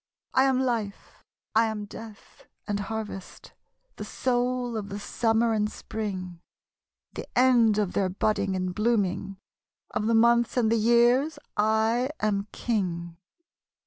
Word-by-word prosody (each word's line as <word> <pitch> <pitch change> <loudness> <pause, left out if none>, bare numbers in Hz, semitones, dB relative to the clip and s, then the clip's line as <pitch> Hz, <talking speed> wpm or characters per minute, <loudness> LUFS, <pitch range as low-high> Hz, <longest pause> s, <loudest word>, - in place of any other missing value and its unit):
I 260 - +4
am 265 -1 +2
Life, 230 -6 -3 0.3
I 225 +1 +4
am 215 -1 -4
Death, 215 0 -12 0.2
and 205 -1 -1
Harvest, 210 -2 -6 0.4
The - - -5
Soul 245 -1 -1
of 205 -2 -4
the 200 - -5
Summer 225 +2 +1
and 210 -1 +1
Sprmg, 185 -6 -5 0.7
The - - -7
end 240 -4 +5
of 205 -4 0
their 190 -2 +1
budding 195 0 0
and 185 -1 -2
blooming, 200 -3 0 0.5
Of 215 - -1
the 230 - +3
Months 235 +2 +3
and 225 -3 +3
the 230 - +3
Years 240 +7 +3 0.2
1 220 +4 +2
am 205 -1 0
King. 175 -7 -2
220 Hz, 135 wpm, -27 LUFS, 200-235 Hz, 0.7 s, end